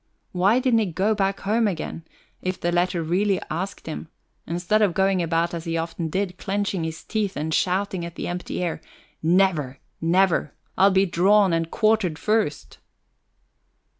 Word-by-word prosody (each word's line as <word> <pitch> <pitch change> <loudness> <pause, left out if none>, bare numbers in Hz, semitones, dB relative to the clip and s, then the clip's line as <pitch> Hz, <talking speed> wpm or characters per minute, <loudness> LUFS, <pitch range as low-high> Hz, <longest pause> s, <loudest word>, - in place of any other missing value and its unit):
Why 190 +6 +3
didn't 255 -3 +3
he 215 - +1
go 190 +5 +1
back 195 -2 -1
home 220 +3 +2
again, 165 -3 -4 0.4
if 185 0 -3
the 175 - 0
letter 175 -1 +1
really 190 +4 +1
asked 185 +5 -4
him, 160 0 -6 0.4
instead 175 +6 +1
of 195 -5 +2
going 190 -1 +2
about 165 0 0
as 165 -1 -5
he 165 0 -1
often 165 0 -3
did, 185 +1 -2
clenching 200 -3 -1
his 160 -1 -5
teeth 210 -3 -2
and 155 +2 -2
shouting 185 0 0
at 170 0 -7
the - - -4
empty 180 0 -4
air: 170 -2 -3 0.4
"Never, 160 -6 +2 0.2
never! 170 -2 +2 0.2
I'll 195 - +5
be 190 0 +3
drawn 190 +2 +4
and 165 0 0
quartered 215 -7 +1
first?" 210 - -1
180 Hz, 165 wpm, -24 LUFS, 165-200 Hz, 0.4 s, I'll